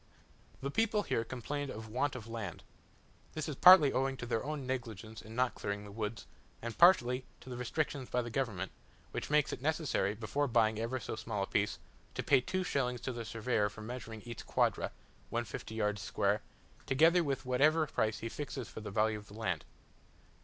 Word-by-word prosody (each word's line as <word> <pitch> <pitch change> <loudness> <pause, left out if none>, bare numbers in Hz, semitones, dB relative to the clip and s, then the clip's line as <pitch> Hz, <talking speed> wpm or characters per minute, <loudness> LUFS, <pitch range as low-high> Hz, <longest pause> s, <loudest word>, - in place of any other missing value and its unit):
The 140 +1 -2
people 220 +2 +2
here 115 - 0
complained 140 +4 -4
of 110 -2 -6
want 130 +5 0
of 120 -4 -6
land. 110 -6 -5 0.7
This 155 -1 -3
is 150 - -3
partly 170 -3 +9
owing 135 +1 +1
to 120 - -5
their 115 -2 -1
own 145 -1 -3
negligence 115 -4 -4
in 110 +1 -10
not 125 0 +2
clearing 100 0 -3
the 105 - -10
woods, 110 +1 -4 0.3
and 115 0 -5
partly 130 -8 +6 0.2
to 125 -1 -7
restrictions 130 +2 -2
by 125 0 +1
the 120 - -6
government, 110 -8 -1 0.4
which - - -4
makes 150 -1 +3
it - - -6
necessary, 145 - +1
before 130 +7 -1
buying 110 -3 +3
ever 120 +3 -1
so 110 - -4
small 105 -3 -2
a - - 0
piece, 105 +1 0 0.4
to - - -2
pay 135 -3 +5
two 185 +8 -1
shillings 125 -7 0
to 130 - -3
the 120 -1 -4
surveyor 110 -1 0
for 105 +1 -11
measuring 110 -1 -7
each 120 -1 -7
quadra - - +2 0.4
(150 115 -1 -4
yards 105 -2 0
square), 105 +1 +1 0.5
together 165 +6 +5
with 135 -3 -2
whatever 150 +5 +4
price 110 -6 -1
he 115 - -2
fixes 140 +2 -5
for - - -8
the 105 - -5
value 110 +1 +1
of 105 - -15
the 100 - -12
land. 95 -8 -2
120 Hz, 190 wpm, -34 LUFS, 110-140 Hz, 0.7 s, partly